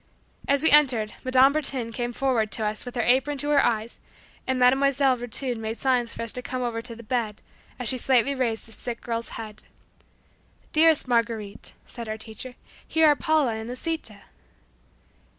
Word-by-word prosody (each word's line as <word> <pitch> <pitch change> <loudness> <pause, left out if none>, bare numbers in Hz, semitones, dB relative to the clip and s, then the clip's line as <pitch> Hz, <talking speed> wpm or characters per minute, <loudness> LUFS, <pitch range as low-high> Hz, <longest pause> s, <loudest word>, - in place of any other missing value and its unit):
As 280 +1 +3
we 320 - +6
entered, 255 -8 +4
Madame 260 +1 +5
Bertin 265 -6 -2
came 240 +1 -3
toward 235 -4 0
us 215 +1 -2
with 245 - -7
her 240 - 0
apron 265 +4 +2
to 290 +2 0
her 285 - +5
eyes 225 -1 -1 0.5
and 260 0 0
Mile. 250 0 +6 0.2
Virtud 255 -2 0
made 220 +1 -4
signs 250 -3 0
for - - -4
us 230 - -3
to 250 - -5
come 255 0 -4
over 230 -2 -2
to 230 0 -10
the 235 - -12
bed, 230 -3 -2 0.4
as 250 - -3
she 255 +3 +2
slightly 260 +2 +3
raised 240 -4 -1
the 225 - -16
sick 235 +2 -6
girl's 230 -1 -3
head. 215 -2 -5 1.1
"Dearest 315 -2 +4
Marguerite," 230 -4 -1
said 235 -2 -8
our 215 - -3
teacher; 220 +3 -8 0.3
"Here 320 0 +3
are 295 - +5
Paula 310 -6 +1
and 220 +1 -6
Lisita." 250 - -5
245 Hz, 175 wpm, -25 LUFS, 225-265 Hz, 1.1 s, we